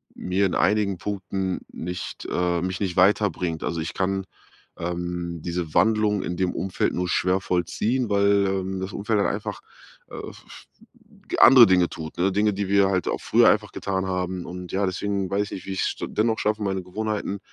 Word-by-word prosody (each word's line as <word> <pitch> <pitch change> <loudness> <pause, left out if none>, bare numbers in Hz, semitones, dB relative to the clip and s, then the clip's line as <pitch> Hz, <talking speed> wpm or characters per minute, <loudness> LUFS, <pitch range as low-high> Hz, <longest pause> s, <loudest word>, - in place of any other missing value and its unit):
mir 95 +2 0
in 90 - -3
einigen 105 -3 +2
Punkten 95 -1 -3
nicht, 90 +2 -6
äh 90 -1 0
mich 90 +1 -3
nicht 95 -3 -2
weiterbringt. 90 -4 +2
Also, 85 - -2
ich 80 - -4
kann, 95 0 -1 0.5
ähm, 85 -1 -4
diese 85 -3 -3
Wandlung 105 -2 +3
in 90 - -3
dem 95 -1 0
Umfeld 95 -1 -1
nur 90 0 -1
schwer 90 +2 +2
vollziehen, 110 +8 -1
weil, 100 0 +3
ähm, 95 0 -2
das 95 +1 -4
Umfeld 105 +1 0
halt 100 - +2
einfach, 105 0 -4 0.5
äh, - - -9
f - - -9
f - - -13 0.4
hm, - - -22 0.2
andere 125 -2 +9
Dinge 90 -2 +4
tut, 80 -1 -8
ne? 95 +3 +2
Dinge, 105 +2 +2
die 100 0 -2
wir 100 -1 +4
halt 95 -3 0
auch - - -1
früher - - +5
einfach - - +1
getan 95 -1 -2
haben. 90 -1 -3
Und, 90 0 -8
ja, 100 +1 +1
deswegen 95 +1 -2
weiß 100 +2 +1
ich - - -12
nicht, 95 - -7
wie - - -4
ich's 95 - -1
dennoch 110 +1 0
schaffe, 105 +1 0
meine 95 -2 -2
Gewohnheiten, 105 +1 -3
95 Hz, 190 wpm, -24 LUFS, 90-100 Hz, 0.5 s, andere